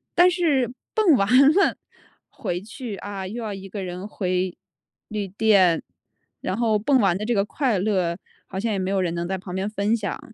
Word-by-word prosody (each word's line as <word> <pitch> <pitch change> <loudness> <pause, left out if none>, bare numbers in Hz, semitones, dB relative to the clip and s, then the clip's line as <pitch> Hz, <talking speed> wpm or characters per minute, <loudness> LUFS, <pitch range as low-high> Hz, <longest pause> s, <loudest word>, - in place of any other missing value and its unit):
但 355 +1 +7
是 285 -9 +1 0.2
蹦 395 -10 +5
完 195 -3 +2 0.3
了 395 +1 +3 0.5
回 175 +1 -4
去， 220 0 -7
啊， 195 -2 -6
又 235 +5 -5
要 210 -2 -3
一 195 0 -8
个 195 -1 -5
人 180 +2 -6
回 185 -3 -1 0.5
旅 210 -2 -3
店， 190 -4 +3 0.6
然 185 - -2
后 220 -3 +2
蹦 265 +4 +3
完 195 -5 +3
的 210 - -5
这 235 +2 0
个 200 0 +2
快 250 -4 0
乐， 185 -3 0 0.3
好 190 - -5
像 225 +1 -1
也 195 - -1
没 185 0 -2
有 195 -1 +1
人 175 -2 0
能 170 0 -3
在 190 0 -2
旁 185 -1 -8
边 195 +2 -1
分 210 +1 +1
享 210 -3 -3
200 Hz, 215 characters per minute, -24 LUFS, 185-225 Hz, 0.6 s, 但